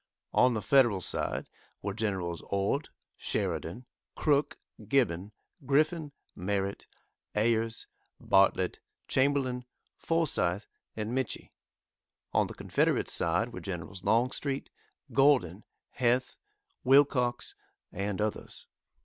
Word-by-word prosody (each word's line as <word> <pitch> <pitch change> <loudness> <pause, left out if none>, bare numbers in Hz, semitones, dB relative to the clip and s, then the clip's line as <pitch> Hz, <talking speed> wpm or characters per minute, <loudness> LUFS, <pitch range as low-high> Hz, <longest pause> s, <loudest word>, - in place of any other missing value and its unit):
On 125 -1 +4
the 110 - -2
Federal 120 -4 +4
side - - -2 0.4
were - - -2
Gens. 95 -6 -2
Ord, 100 +9 0 0.3
Sheridan, 100 +10 -2 0.3
Crook, 145 -1 +1 0.3
Gibbon, 105 -7 +1 0.3
Griffin, 150 +3 +1 0.2
Merritt, 100 +1 -2 0.5
Ayers, 115 +1 +1 0.3
Bartlett, 95 -2 +3 0.3
Chamberlain, 130 -2 +1 0.3
Forsythe, 110 - +1 0.3
and 110 +1 -3
Mitchie. 130 -1 -3 0.8
On - - +3
the - - -9
Confederate - - +1
side - - +1
were - - -5
Generals 90 0 -6
Longstreet, 130 +4 0 0.4
Gordon, 130 - +3 0.3
Heth, 125 +1 +1 0.4
Wilcox, 130 -2 +3 0.4
and 100 +1 -3
others. 105 0 -3
115 Hz, 95 wpm, -30 LUFS, 100-135 Hz, 0.8 s, On